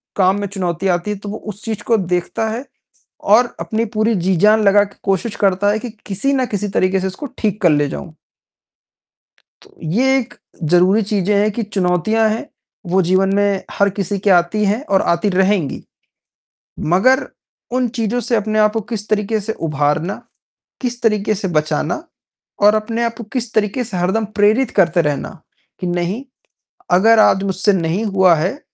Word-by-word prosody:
काम 190 +1 +2
में 200 - -2
चुनौतियाँ 185 -1 -1
आती 175 +4 -4
हैं, 200 - -5
तो 205 - -7
वो 215 - -5
उस 210 0 -9
चीज़ 220 -2 -4
को 230 -1 +2
देखता 180 +4 -2
है, 240 +5 -5 0.6
और 235 +4 +3
अपनी 225 +1 -2
पूरी 220 +1 +2
जी-जान 195 +4 +3
लगा 205 0 +5
के 200 -1 -10
कोशिश 195 +3 -1
करता 200 +1 +2
है 215 - -1
कि, 245 - -6 0.2
किसी 215 +8 -1
न 260 -2 +1
किसी 205 -2 -3
तरीके 190 0 +1
से 190 - -2
इसको 190 +10 -7
ठीक 210 -1 -2
कर 175 - +5
ले 145 -1 +2
जाऊँ। 160 -1 -8 1.5
तो, - - -21
ये 250 +12 +2
एक 245 -2 -5 0.3
ज़रूरी 180 +6 +3
चीज़ें 205 0 0
हैं 215 +1 +2
कि 230 - -3
चुनौतियाँ 205 +2 +1
हैं, 220 - -3 0.4
वो 185 +2 +2
जीवन 190 +2 +2
में 200 -1 +1 0.2
हर 200 0 +3
किसी 195 0 -3
के 200 +1 0
आती 180 +4 +3
हैं 215 +8 0
और 195 -10 +1
आती 170 +4 +1
रहेंगी। 190 -4 0 1.1
मगर 260 +8 +3 0.5
उन 250 -2 +1
चीज़ों 230 +2 -1
से 235 -1 0
अपने 215 0 -1
आप 215 0 +4
को 225 - -1
किस 210 -1 -4
तरीके 215 +1 0
से 220 +2 -3
उभारना, 155 +2 -1 0.6
किस 245 -1 -3
तरीके 215 -1 +1
से 195 0 -3
बचाना 155 - -1 0.6
और 210 +1 +6
अपने 225 +2 -1
आप 230 -1 -2
को 235 - -7
किस 240 -3 -3
तरीके 215 +4 0
से 210 -6 -5
हरदम 190 +5 0
प्रेरित 220 +5 +3
करते 170 -1 +4
रहना, 150 +3 -3 0.4
कि 180 - -3
नहीं, 175 +8 -2 0.7
अगर 220 +5 +5
आज 190 -2 +4
मुझसे 195 +1 +1
नहीं 180 +4 -1
हुआ 190 -4 +4
है, 185 - -2
205 Hz, 180 wpm, -18 LUFS, 185-220 Hz, 1.5 s, और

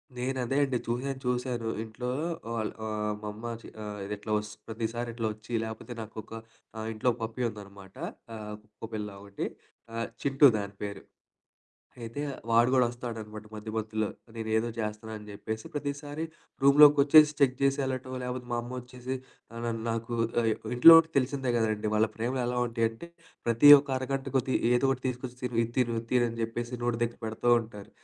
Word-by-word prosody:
నేను 130 +2 -2
అదే 135 +4 -1
అండి 130 -3 0
చూసాను, 130 +3 -2
చూసాను. 125 -2 -1
ఇంట్లో 120 +3 -5 0.4
వాళ్ళు 110 -2 -2 0.2
ఆహ్, 105 0 -1
మా - - -4
అమ్మ 115 +2 -6
చి - - -11 0.2
ఆహ్, 105 -1 -6
ఇది 105 - -4
ఇట్లా 105 +1 -6
వస్త్ 105 0 -5
ప్రతిసారి 115 +1 -3
ఇట్లా 115 -2 -1
ఒచ్చి 110 +2 -15
లేకపోతే 110 +2 -6
నాకొక 110 0 -9 0.6
ఇంట్లో 120 +3 +2
పప్పీ 115 +3 -3
ఉందనమాట. 100 -2 -12 0.4
ఆహ్, 105 -1 -6
కుక్కపిల్ల 105 0 -6
ఒకటి. 100 0 -4 0.7
చింటు 140 +1 +4
దాని 100 -1 -3
పేరు. 100 -1 -5 1.0
అయితే 115 +6 -5 0.3
వాడు 115 +2 +5
గూడా 125 -2 +5
వస్తాడనమాట 110 -3 -7
మధ్య 110 +1 -7
మధ్యలో. 110 -1 -1 0.3
నేనేదో 110 +1 0
జేస్తున్నానని 105 0 -5
జెప్పేసి 110 +2 -5
ప్రతిసారి 145 +1 -4 0.4
రూమ్‌లోకొచ్చేసి 145 +1 +8
చెక్ 130 -2 +4
జేసి 140 +1 +3
ఎళ్ళటం 130 0 -3
లేకపోతే 125 0 -4
మా 120 - +1
అమ్మొచ్చేసి 125 +1 -6 0.4
ఆహ్, 115 0 -7
న - - 0 0.2
నాకు 115 +1 -2 0.3
ఆహ్, 115 -1 +2 0.3
ఇంట్లో 165 +7 +11
ఉంటే 165 0 -1
తెలిసిందే 135 0 0
గదండీ 110 -1 0
వాళ్ళ 110 +1 +4
ప్రేమలు 125 +3 -1
ఎలా 125 0 -1
ఉంటాయంటే 115 +5 -2 0.4
ప్రతి 120 +5 +6
ఒక్క 140 0 -4
అరగంట 135 +1 -2
కొద్ది 130 0 +1 0.2
ఏదో 125 +2 +3
ఒకటి 130 -1 -1
తీసుకొచ్చి 125 0 -5
"తిను 125 -2 -2
ఇది 115 - -5
తిను, 120 -2 +2
ఇది - - -7
తిను" 125 -1 +4
అని 115 - -7
చెప్పేసి 120 +2 -3
నోటి 120 -1 0
దగ్గర 120 0 -3
పెడుతూ 110 +2 -3
ఉంటారు. 105 -3 -11
120 Hz, 165 wpm, -29 LUFS, 110-130 Hz, 1.0 s, ఇంట్లో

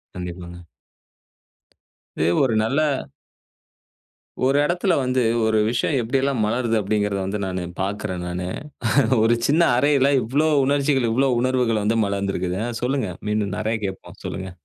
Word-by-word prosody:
கண்டிப்பாங்க. 90 -1 -7 1.6
இது 80 - +2 0.2
ஒரு 130 -4 +1
நல்ல 135 +7 +1 1.6
ஒரு 135 +2 +3
இடத்துல 175 +3 +1
வந்து, 130 -1 +1 0.2
ஒரு 110 0 +2
விஷயம் 135 +4 0
எப்படி 120 +4 0
எல்லாம் 135 -4 0
மலருது? 115 +1 0
அப்படிங்கிறத 105 0 -1
வந்து 100 +2 -3
நானு 95 -1 -3 0.2
பாக்குறேன் 95 -2 -3
நானு. 90 +1 -4 0.8
ஒரு 115 +1 +4
சின்ன 155 +4 +3 0.2
அறையில 140 0 +3
இவ்ளோ 140 +8 +1 0.2
உணர்ச்சிகள், 140 -2 +1
இவ்ளோ 135 +4 +2
உணர்வுகள் 125 -4 +1
வந்து 115 +2 +1
மலர்ந்து 100 -1 -2
இருக்குது. 90 +1 -2
அ - - -3
சொல்லுங்க, 125 -5 -1 0.2
மீண்டும் 105 -2 -1
நிறைய 110 +1 -1
கேட்போம். 95 -1 -9
சொல்லுங்க. 95 0 -5
110 Hz, 135 wpm, -22 LUFS, 100-130 Hz, 1.6 s, ஒரு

